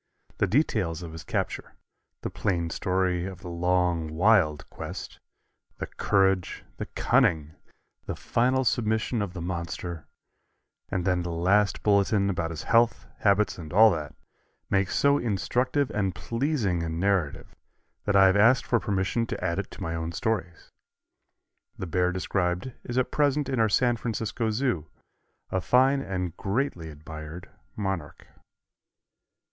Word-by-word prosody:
The - - +3
details 95 - 0
of 85 - -7
his 80 0 -8
capture, - - -3 0.5
the - - -4
plain 85 -4 -1
story 90 0 0
of 95 -2 -9
the 90 - -7
long, 90 -1 +1
wild 80 -2 +3
quest, - - -7 0.6
the - - -3
courage, 95 -2 +1
the - - -5
cunning, 75 -2 +2 0.6
the - - -3
final 130 +2 +1
submission 110 0 0
of 100 -3 -3
the 85 - -5
monster, 85 -2 -5 0.8
and 90 -2 -2
then 90 -2 +2
the 85 - -4
last 95 +5 +2
bulletin 100 -1 +3
about 85 -3 -2
his 80 -2 -6
health, 115 0 +3
habits 100 -1 +2
and 80 -3 -8
all 110 +4 +7
that, 75 -4 -4 0.6
make 95 0 +2
so 140 0 +3
instructive 125 +5 0
and 95 -3 -1
pleasing 115 - -1
a 85 - -2
narrative 85 -2 -1 0.5
that 105 - +1
I 95 0 +7
have 95 0 +5
asked 115 +5 +5
for 120 - +2
permission 105 +3 -1
to - - -5
add 85 -2 0
it - - -4
to - - -8
my 85 - -3
own 80 0 -3
stories. 95 -6 -3 1.1
The - - -4
bear 90 +1 +1
described 90 +3 -1
is 120 - -4
at 130 - +1
present 145 -1 +2
in 130 -3 -1
our 110 -1 +4
San 120 +3 +2
Francisco 115 0 -2
Zoo, 110 - -1 0.6
a 95 - 0
fine 130 +7 +4
and 90 -6 -3
greatly 100 - -2
admired 80 +3 -9 0.2
monarch. 95 -7 -4
95 Hz, 145 wpm, -27 LUFS, 85-115 Hz, 1.1 s, all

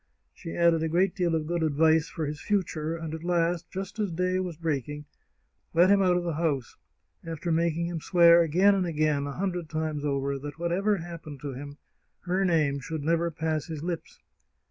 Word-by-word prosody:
She 165 -3 -8
added 170 -1 +4
a 160 - 0
great 180 +3 +2
deal 175 -2 +1
of 155 -1 -1
good 170 +1 -1
advice 160 +1 +3
for 160 - -3
his 150 0 -5
future, 165 -6 -1
and 160 -1 -6
at 160 0 -6
last, 170 0 0
just 195 +3 -6
as 205 -4 0
day 180 +2 0
was 180 -4 -4
breaking, 150 -2 -3 0.7
let 175 +3 +6
him 200 -1 +5
out 180 -2 +3
of 175 - -1
the 170 -1 -2
house, 145 -5 -1 0.5
after 165 +1 -4
making 170 0 +1
him 170 -2 -4
swear 170 0 +6
again 180 +5 +4
and 190 -2 0
again, 150 -3 0
a 140 - -5
hundred 180 -3 -2
times 155 -2 -2
over, 140 -1 -1
that, 145 +1 -7
whatever 185 +5 +1
happened 165 -4 -8
to 140 -2 -5
him, 145 +2 -8 0.4
her 185 +2 0
name 155 -6 +2
should 150 +2 -5
never 170 +2 +1
pass 160 -1 -2
his 160 -2 -6
lips. 170 -1 -5
165 Hz, 195 wpm, -27 LUFS, 155-175 Hz, 0.7 s, let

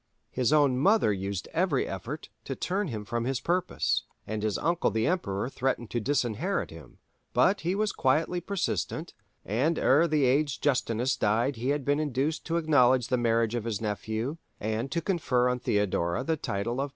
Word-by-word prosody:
His 125 0 +1
own 145 -4 +4
mother 195 - +4
used 95 -1 -4
every 165 -5 +1
effort 115 - -6 0.2
to 135 - -3
turn 195 +7 -1
him 110 -6 -5
from 120 +1 -2
his 130 -1 -1
purpose, 180 +1 0 0.2
and 110 0 -3
his 105 -1 0
uncle 170 +1 +1
the 110 0 0
Emperor 110 - -1
threatened 130 -3 -2
to 120 - 0
disinherit 120 -3 -1
him: 80 -6 -13 0.4
but 190 - +3
he 175 +3 0
was 210 0 +1
quietly 160 +7 +1
persistent, 175 -3 -2 0.3
and 135 - +1
ere 150 +6 +4
the 150 -3 +2
aged 140 +2 +1
Justinus 125 -2 +1
died 120 +4 +1
he 125 +4 -2
had 145 -2 0
been 145 +1 +2
induced 150 +1 -1
to 165 0 0
acknowledge 130 -6 +3
the 130 - +2
marriage 115 -1 +1
of 120 -2 -2
his 110 -4 -2
nephew, 110 +6 -3 0.2
and 110 +5 -2
to 170 - 0
confer 150 -9 +1
on 125 0 0
Theodora 105 -1 0
the 160 +4 0
title 120 -1 -2
of 140 - -1
"Patrician." - - -15
130 Hz, 185 wpm, -28 LUFS, 110-155 Hz, 0.4 s, own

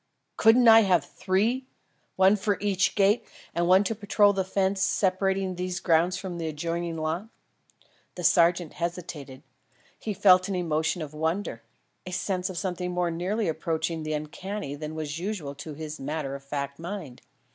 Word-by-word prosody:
Couldn't 235 +2 +5
I 225 0 +10
have 190 -6 +3
three? 225 +8 0 0.5
One 190 +2 +5
for 205 0 0
each 195 -2 +1
gate 205 +2 +3 0.3
and 170 0 0
one 185 +2 +6
to 205 - -1
patrol 205 -1 +3
the 195 -1 0
fence 190 +1 0
separating 190 0 +1
these 180 0 -3
grounds 170 +1 +2
from 180 -3 -6
the 165 - -2
adjoining 165 +2 -3
lot?" 160 +6 -2 0.9
The 180 - -6
sergeant 170 -1 +3
hesitated; 165 -6 -5 0.6
he 210 -2 -4
felt 185 -1 +5
an 195 - -1
emotion 165 -1 0
of 150 -1 -8
wonder 160 - -2 0.4
a 185 - -8
sense 185 0 -1
of 185 - -6
something 180 -1 -2
more 180 -1 0
nearly 190 +6 -1
approaching 160 0 -2
the 155 0 -3
uncanny 155 +3 -5
than 155 +2 -6
was 155 0 -4
usual 180 -7 -4
to 145 +2 -8
his 155 0 -7
matter 145 0 -3
of 140 0 -7
fact 140 0 -4
mind. 170 -7 -7
180 Hz, 165 wpm, -27 LUFS, 155-195 Hz, 0.9 s, I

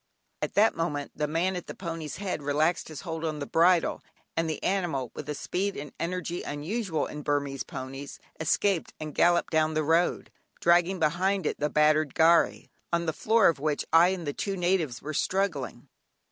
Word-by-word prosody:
At - - -3
that 215 +2 +5
moment 150 -4 -2
the 150 - -1
man 170 +5 0
at 180 - -6
the - - -7
pony's 165 -4 -5
head 185 -4 -3
relaxed 150 +4 +1
his 155 -3 -8
hold 165 -1 -5
on 155 -2 -2
the 145 - -4
bridle, 170 +3 +3 0.3
and 165 -1 0
the 155 - -4
animal, 170 -10 -1
with 150 - -7
a 150 - -2
speed 195 +6 -2
and 145 -1 -7
energy 175 0 -3
unusual 160 +3 -2
in 150 - -7
Burmese 145 -2 -1
ponies, 135 +2 -7 0.2
escaped 170 +3 +1
and 155 -1 -6
galloped 175 0 +3
down 155 -1 +2
the 155 - +1
road, 165 +3 +1 0.3
dragging 175 +2 +3
behind 180 +4 +1
it - - -1
the 150 - 0
battered 150 0 +3
gharry, 165 +1 +3 0.2
on 170 0 +1
the 160 - -1
floor 220 +6 +4
of 165 -5 +2
which 150 0 -1
I 165 +2 +7
and 185 -2 -2
the 145 - -2
two 195 +4 -3
natives 175 -8 0
were 155 +2 -4
struggling. 150 -9 -1
160 Hz, 190 wpm, -28 LUFS, 150-180 Hz, 0.3 s, I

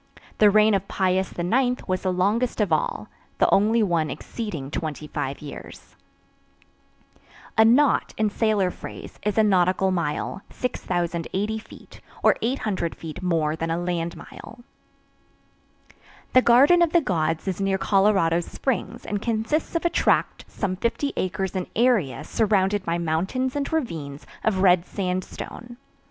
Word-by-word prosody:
The 210 - +7
reign 215 +1 +5
of 195 0 0
Piux 185 -1 +1 0.2
IX 245 +8 0
was 185 -1 -1
the 185 - 0
longest 210 +8 0
of 200 -6 +1
all, 155 - -1 0.3
the - - +4
only 220 +3 +4
one 170 -5 +1
exceeding 160 - -6
25 150 -3 -4
years. 145 - -10 1.6
A 220 - +6
knot, 255 +6 +4
in 215 -1 +1
sailor 205 -4 +1
phrase, - - -10
is 210 +1 -2
a 220 - +5
nautical 190 -1 +2
mile, 170 +2 -2
6,080 185 -1 -2
feet, - - -15 0.2
or - - +5
800 215 -8 -2
feet 160 +1 -8
more 165 -4 0
than 165 0 -3
a 165 - 0
land 175 -1 -2
mile. 235 +2 -12 1.7
The 255 - +7
Garden 275 +9 +6
of 335 -2 +2
the 340 - +5
Gods 165 - -1
is 190 0 -2
near 195 0 +1
Colorado 195 -4 +3
Springs 230 +4 -3
and 205 -1 -3
consists 230 +10 -1
of 335 - -1
a - - +4
tract - - +1
some 185 -3 -3
50 235 +7 -1
acres 190 +1 -2
in 185 -1 -2
area 225 - +2
surrounded 205 -2 +1
by 170 0 0
mountains 185 - -1
and 285 -1 -2
ravines 160 - -3 0.2
of 195 -3 +1
red 180 -2 +5
sandstone. 190 +6 -5
195 Hz, 140 wpm, -24 LUFS, 175-225 Hz, 1.7 s, The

